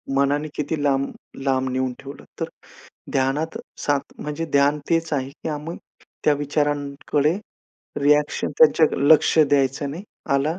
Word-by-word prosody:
मनाने 145 +2 +2
किती 150 0 -2
लांब 140 -1 +1 0.4
लांब 130 -1 +1
नेऊन 130 0 -1
ठेवलं 140 +1 -10 0.2
तर, - - 0 0.7
ध्यानात 135 +4 0 0.2
सात 145 -2 -1
म्हणजे 150 +2 -4
ध्यान 145 +1 +4
तेच 165 0 +1
आहे, 135 -1 -1
की 150 - -7
आम्ही 155 +3 -5 0.5
त्या 150 - +5
विचारांकडे 145 0 0 0.7
रिएक्शन 150 +1 +2
त्यांच्या 460 - +6
लक्ष 155 +3 +5
द्यायचं 140 -1 +3
नाही. 165 +6 -6 0.3
आला 150 +5 +1
145 Hz, 130 wpm, -23 LUFS, 140-150 Hz, 0.7 s, त्यांच्या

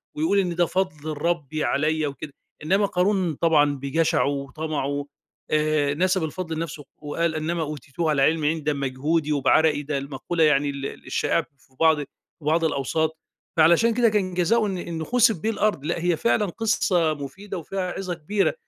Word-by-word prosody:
ويقول 160 +7 +2
إن 180 -3 0
ده 175 0 +3
فضل 165 -4 -2
ربي 155 -2 -1
عليّا 155 +2 +1
وكده. 140 +1 -7 0.3
إنما 195 +6 +2
قارون 185 -2 +1
طبعًا 150 -2 +3
بجشعه 155 +4 +1
وطمعه، 145 0 -3 0.5
آآ 150 -2 +2
نسب 185 +3 +1
الفضل 165 +1 -4
لنفْسه 155 -2 -5 0.2
وقال: 160 +2 -1
"إِنَّمَا 165 +2 -2
أُوتِيتُهُ 150 +1 -3
عَلَىٰ 145 -3 +2
عِلْمٍ 155 +2 +2
عِندِي." 160 +2 +1
ده 150 0 0
بمجهودي 145 +3 -1
وبعرقي، 150 +1 +3
ده 145 0 -2
المقولة 140 +5 -2
يعني 145 -2 +3
ال 140 -1 -5 0.2
الشائعة 150 +3 +1 0.2
في 130 0 -28
بعض 160 -1 +5 0.4
بعض 160 +3 +1
الأوساط، 160 +2 -1 0.4
فعلشان 170 +9 +5
كده 235 0 +4
كان 200 -4 0
جزائه 215 +6 +2
إن 195 -3 -2
إنه 170 -2 -4
خُسف 235 -1 +3
بيه 220 - -1
الأرض، 210 -9 0
لأ - - -1
هي 175 -2 +2
فعلًا 230 0 +2
قصّة 180 -5 +1
مفيدة 155 +9 -7
وفيها 185 +2 -3
عظة 185 -1 -4
كبيرة، 185 +5 0
160 Hz, 165 wpm, -24 LUFS, 145-180 Hz, 0.5 s, بعض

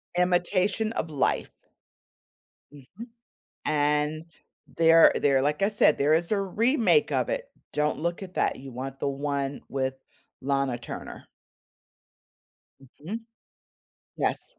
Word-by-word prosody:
Imitation 185 +4 +1
of 160 - -3
Life. 145 -3 0 1.2
Mhm. 145 - -12 0.6
And 150 +1 0 0.5
there 165 0 +7
there 135 -2 +2
like 150 +4 0
I 195 - +4
said, 205 -7 +4
there 145 +2 +3
is 170 +4 +1
a 210 - +2
remake 230 - +2
of - - 0
it. - - -3 0.2
Don't 150 0 0
look 170 +3 -2
at 185 -1 -11
that. - - 0
You 135 -1 -10
want 135 +2 -6
the - - -1
one 140 0 -2
with 130 -1 -2 0.4
Lana 135 -2 0
Turner. 120 - -8 1.5
Mhm. 150 - -8 1.0
Yes. - - -2
150 Hz, 120 wpm, -26 LUFS, 140-185 Hz, 1.5 s, there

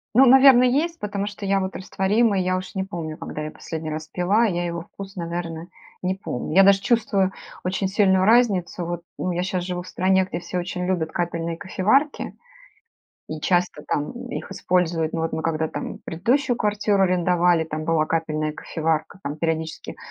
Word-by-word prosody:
Ну, 265 - +8
наверно, 265 -1 +8
есть, 310 +7 +1
потому 205 -1 -3
что 205 0 -7
я 195 0 +2
вот 190 0 -3
растворимый- 195 +2 +1
я 185 0 +1
уж 185 +2 -6
не 190 - -1
помню, 165 -5 -5
когда 150 - -6
я 155 - -4
последний 160 0 -6
раз 155 0 -5
пила,- 195 +6 +2
я 175 -3 -1
его 170 -1 -3
вкус, 195 +3 -11
наверно, 170 -1 -4 0.3
не 185 +1 0
помню. 155 -6 -5
Я 195 - +8
даже 195 0 +6
чувствую 200 -5 +1 0.3
очень 190 +1 -1
сильную 190 -1 +3
разницу. 200 -7 +3
Вот, 175 0 -4 0.2
ну, 180 - -1
я 175 +1 -1
щас 185 -1 -2
живу 180 -1 -3
в 180 - -12
стране, 190 +1 +2
где 175 -2 -5
все 180 - -4
очень 180 0 -3
любят 170 -4 -1
капельные 170 -1 -2
кофеварки 220 +10 +1 0.9
и 155 0 -5
часто 175 -3 0
там 145 0 -1 0.2
их - - -6
используют. 175 -4 0
Мы 165 - -2
вот 165 - -2
мы 160 - -2
когда 160 -1 0
там - - -6
предыдущую 245 - +1
квартиру 205 -2 +1
арендовали, 180 -2 +3
там 155 0 -5
была 160 -1 +2
капельная 155 -1 -1
кофеварка. 160 +3 -2
Там, 145 +2 -4
периодически, 160 0 -3
180 Hz, 180 wpm, -23 LUFS, 165-195 Hz, 0.9 s, Ну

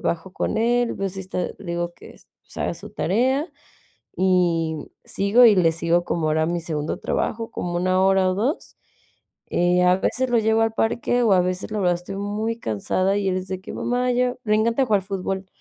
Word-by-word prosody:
bajo 175 +2 -3
con - - -2
él, 240 +1 +1
veo 195 - -2
si 190 +1 -7
está, 185 -1 -3
le 200 - -13
digo 175 0 -2
que, - - -14 0.3
pues, - - -16
"Haga - - -2
su - - -10
tarea", 260 - +1 0.7
y 175 -4 +2 0.3
sigo 205 +5 +3
y 225 -3 +8
le 175 -4 +4
sigo, 170 +1 +1
como 165 -2 -1
ahora 155 +1 +1
a 160 - +1
mi 175 0 -1
segundo 155 -2 -3
trabajo, 225 +1 -2
como 175 0 -3
1 185 +1 +2
hora 190 -1 +3
o 185 - -1
2. 245 - -2 0.7
Eh, 180 +1 +2
a 180 +1 +5
veces 255 +6 -1
lo 240 - +3
llevo 220 +1 +2
al 225 0 +1
parque, 235 +2 0
o 220 -4 +3
a 185 - +5
veces, 180 +3 -2
la 215 - -2
verdad, 180 -2 +2
estoy 180 +3 -8
muy 210 +3 -3
cansada 185 - -1
y 200 -1 -1
el 185 - 0
es 185 - -7
de 190 0 -4
que: - - -9
"Mamá, 250 +1 0
llevame" 250 0 +1
le 215 -1 +2
encanta 230 +5 +2
jugar 205 -4 +2
fútbol, 195 0 -4
190 Hz, 210 wpm, -23 LUFS, 180-225 Hz, 0.7 s, y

